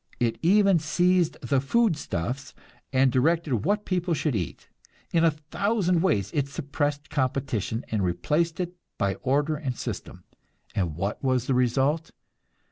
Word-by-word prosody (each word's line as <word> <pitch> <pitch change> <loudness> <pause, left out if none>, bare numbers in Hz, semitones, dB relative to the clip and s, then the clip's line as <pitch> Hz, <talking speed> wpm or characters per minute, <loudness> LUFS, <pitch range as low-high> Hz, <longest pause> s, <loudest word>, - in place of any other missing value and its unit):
It 115 -2 0
even 195 0 +5
seized 175 +2 +2
the 130 0 +1
foodstuffs 140 - -1 0.4
and 130 0 +4
directed 150 +1 +2
what 205 +3 +1
people 180 -2 0
should 150 -3 0
eat. 90 -7 -4 0.5
In 165 -1 +4
a 165 - +6
thousand 180 +4 0
ways 100 - +1
it 140 -2 0
suppressed 145 0 -3
competition 130 - -1
and 105 -3 0
replaced 150 - 0
it 175 -1 -2 0.2
by 100 -1 +1
order 145 +4 +1
and 135 -4 -4
system. - - -6 0.5
And 85 -6 -1
what 100 - -3
was 130 -2 +1
the 135 - +1
result? 135 +6 +1
145 Hz, 140 wpm, -26 LUFS, 125-170 Hz, 0.5 s, a